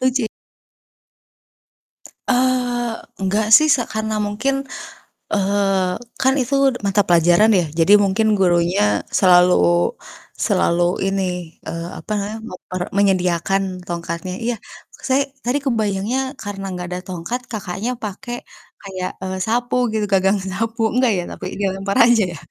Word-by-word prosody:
Lucu. 250 -3 -1 2.0
Eee, 245 -2 +1 0.3
enggak 205 +3 0
sih 310 0 +4
s - - 0 0.2
karena 220 0 -2
mungkin. 225 +7 -1 0.8
eee, 195 -2 +1 0.2
kan 265 0 +4
itu 255 +2 -3 0.2
d 245 - -5
mata 200 +1 +3
pelajaran 175 +5 +5
ya. 175 - +1 0.2
Jadi 180 +5 +5
mungkin 205 +3 +1
gurunya 170 - +2 0.2
selalu, 180 -1 +6 0.9
selalu 170 +1 +2 0.3
ini, 195 0 -1 0.4
eee, 165 0 -5
apa - - -10
namanya 210 +1 -3
muk 185 -5 -9
per 185 -1 -4 0.2
menyediakan 190 -1 +2 0.2
tongkatnya. 170 +1 -4
Iya 240 0 0 0.4
s - - -15
saya 265 +2 +3 0.2
tadi 245 +4 +1
kebayangnya 220 0 0 0.2
karena 200 -1 -6
enggak 180 -1 -5
ada 180 - -3
tongkat 185 +7 -4
Kakaknya 210 +1 -3
pakai 230 +4 -5 0.5
kayak, 185 -2 -5
eee, 190 0 -4
sapu 240 +3 0 0.2
gitu 215 -1 0
gagang 195 +1 +3
sapu, 225 +4 -3
enggak 250 0 +3
ya 175 - -1
tapi - - -8
dilempar 195 0 -1
aja 235 -2 +4
ya. - - -8
200 Hz, 135 wpm, -20 LUFS, 185-230 Hz, 2.0 s, selalu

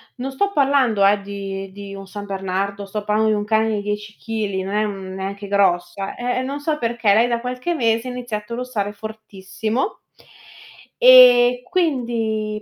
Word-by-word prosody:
Non 265 +1 -5
sto 400 +10 0
parlando, 270 - +3
ehm, 200 0 +3
di 195 -1 -6
di 200 0 -9
un 195 0 -9
San 205 +1 -7
Bernardo, 195 +1 -3
sto 205 +1 -5
parlando 215 +1 +1
di 215 - +1
un 205 - -3
cane 220 +1 +2
di 205 - -2
10 210 +1 -5
kg, 210 -4 -3
non 195 - -4
è 210 - +2
un 210 -1 -2
non 190 -1 -8
è - - -7
neanche 200 +1 -5
grossa. 195 -1 0
Eh, 245 +1 -2
eh, - - -1
non 275 +2 -4
so 300 +1 -1
perché, 230 -4 +1
lei 230 +3 +4
da 235 -1 -1
qualche 250 +7 -3
mese 230 -3 +1
ha - - -4
iniziato 235 -3 -5
a - - -2
russare 230 -5 -3
fortissimo. 215 - -5 1.0
E 250 -1 +8
quindi, 230 - -1
215 Hz, 190 wpm, -21 LUFS, 200-245 Hz, 1.0 s, E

